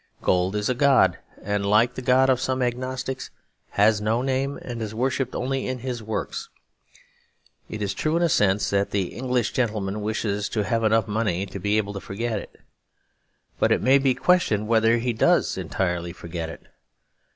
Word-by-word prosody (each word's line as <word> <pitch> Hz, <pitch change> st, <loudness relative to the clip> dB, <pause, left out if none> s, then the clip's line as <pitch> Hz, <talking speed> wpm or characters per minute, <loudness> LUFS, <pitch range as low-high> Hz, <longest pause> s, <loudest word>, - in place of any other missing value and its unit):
Gold 90 Hz, +2 st, +1 dB
is 105 Hz, 0 st, 0 dB
a 125 Hz, -, +2 dB
god; 130 Hz, -8 st, +4 dB, 0.2 s
and 105 Hz, 0 st, -1 dB
like 110 Hz, +5 st, +3 dB
the 130 Hz, -, -6 dB
god 130 Hz, +1 st, +4 dB
of 130 Hz, -1 st, +1 dB
some 130 Hz, -1 st, 0 dB
agnostics 130 Hz, +2 st, -3 dB, 0.5 s
has 105 Hz, 0 st, +4 dB
no 110 Hz, +4 st, 0 dB
name 135 Hz, +1 st, -1 dB
and 120 Hz, -2 st, -6 dB
is 110 Hz, -1 st, -5 dB
worshipped 130 Hz, +1 st, -1 dB
only 135 Hz, +1 st, -2 dB
in 130 Hz, 0 st, -2 dB
his 125 Hz, -1 st, -5 dB
works. 110 Hz, 0 st, -4 dB, 1.2 s
It 105 Hz, -1 st, -4 dB
is 100 Hz, -, -1 dB
true 155 Hz, +2 st, 0 dB
in 175 Hz, -, +1 dB
a -, -, +4 dB
sense 105 Hz, -8 st, +2 dB
that 100 Hz, 0 st, +1 dB
the 95 Hz, -3 st, -1 dB
English 125 Hz, +1 st, -1 dB
gentleman 105 Hz, -4 st, -1 dB
wishes 105 Hz, -1 st, -2 dB
to 105 Hz, -, -1 dB
have 115 Hz, +3 st, 0 dB
enough 110 Hz, -1 st, +3 dB
money 105 Hz, -4 st, -1 dB
to 100 Hz, -, -8 dB
be 105 Hz, +3 st, +1 dB
able 100 Hz, -1 st, -1 dB
to 100 Hz, -, -5 dB
forget 110 Hz, +2 st, -3 dB
it. -, -, -13 dB, 1.0 s
But -, -, +3 dB
it -, -, +2 dB
may 135 Hz, +2 st, +5 dB
be 135 Hz, -2 st, +2 dB
questioned 125 Hz, -, +2 dB
whether 115 Hz, 0 st, +4 dB
he 120 Hz, +1 st, -1 dB
does 110 Hz, -, +2 dB
entirely 85 Hz, -2 st, -2 dB
forget 85 Hz, -2 st, -6 dB
it. -, -, -11 dB
110 Hz, 185 wpm, -24 LUFS, 100-130 Hz, 1.2 s, may